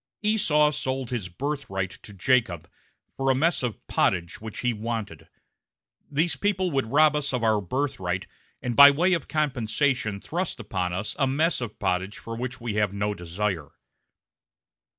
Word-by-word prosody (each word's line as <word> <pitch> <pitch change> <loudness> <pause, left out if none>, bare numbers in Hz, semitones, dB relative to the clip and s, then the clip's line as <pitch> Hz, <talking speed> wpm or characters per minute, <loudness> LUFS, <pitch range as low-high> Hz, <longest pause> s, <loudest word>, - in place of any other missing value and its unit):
Esau 165 -9 +3
sold 130 -3 -3
his 110 -7 -3
birthright 125 - -3
to - - -12
Jacob 100 -4 +1 0.5
for 135 0 0
a 130 - +4
mess 165 +6 +2
of 125 -4 -4
pottage 85 -1 0
which 110 -1 -6
he 125 -1 +1
wanted; 110 -1 -5 0.8
these 155 +2 +1
people 190 +1 0
would 135 -5 -1
rob 150 0 +5
us 150 -1 -1
of 125 -3 -1
our 110 -2 +3
birthright 95 -5 -2 0.4
and 120 -2 -2
by 140 +3 +11
way 175 +7 +2
of 165 -6 -1
compensation 130 -6 0
thrust 175 - -3
upon 95 -5 -2
us 100 +5 -3
a 135 - +3
mess 155 +3 +1
of 115 -3 -5
pottage 95 +1 -1
for 115 - -7
which 125 +1 -5
we 115 -3 -3
have 105 -2 +1
no 105 +1 0
desire. 90 -3 -3
125 Hz, 160 wpm, -26 LUFS, 105-145 Hz, 0.8 s, by